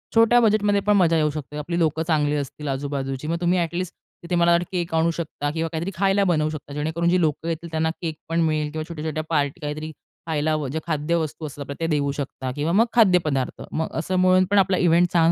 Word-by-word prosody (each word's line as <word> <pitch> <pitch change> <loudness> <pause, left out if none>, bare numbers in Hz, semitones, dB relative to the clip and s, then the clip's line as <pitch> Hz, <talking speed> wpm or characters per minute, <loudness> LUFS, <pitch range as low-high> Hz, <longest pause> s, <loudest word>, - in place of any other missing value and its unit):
छोट्या 230 +2 +6
बजेटमध्ये 205 -2 +3
पण 210 0 +2
मजा 165 -3 +4
येऊ 150 -1 +2
शकते. 150 0 -6
आपली 170 +4 -2
लोकं 160 0 +1
चांगली 150 -2 +2
असतील 145 +1 -5
आजू-बाजूची, 135 0 -3
मग 170 +1 0
तुम्ही 175 +1 +2
अ‍ॅटलिस्ट 170 +1 -2 0.3
तिथे 175 +1 -2
मला 170 0 +4
वाटतं 170 +1 +3
केक 175 -3 -2
आणू 165 +1 +3
शकता 160 -3 -4
किंवा 165 +1 -2
काहीतरी 170 +4 -3
खायला 195 +2 +2
बनवू 155 -5 +2
शकता. 150 -2 -7
जेणेकरून 160 +3 -1
जी 180 - +3
लोकं 160 0 0
येतील, 170 +1 -4
त्यांना 160 0 0
केक 160 -2 -3
पण 165 - 0
मिळेल 155 -2 0
किंवा 155 0 -4
छोट्या-छोट्या 155 -1 -4
पार्टी 150 +2 0
काहीतरी 155 +1 -4 0.4
खायला 155 -1 0 0.2
जे 160 - -1
खाद्यवस्तू 160 0 -1
असतात 140 -1 -7
ते 165 - 0
देऊ 145 -3 +1
शकता 135 -2 -5
किंवा 150 +3 -1
मग 225 +4 +5
खाद्य 195 -7 +5
पदार्थ, 135 -4 -2
मग 160 0 -1
असं 185 +4 -2
म्हणून 185 0 +5
पण 205 - +4
आपला 190 -1 +2
इव्हेंट 175 0 +3
छान 165 -1 +5
160 Hz, 215 wpm, -23 LUFS, 150-175 Hz, 0.4 s, छोट्या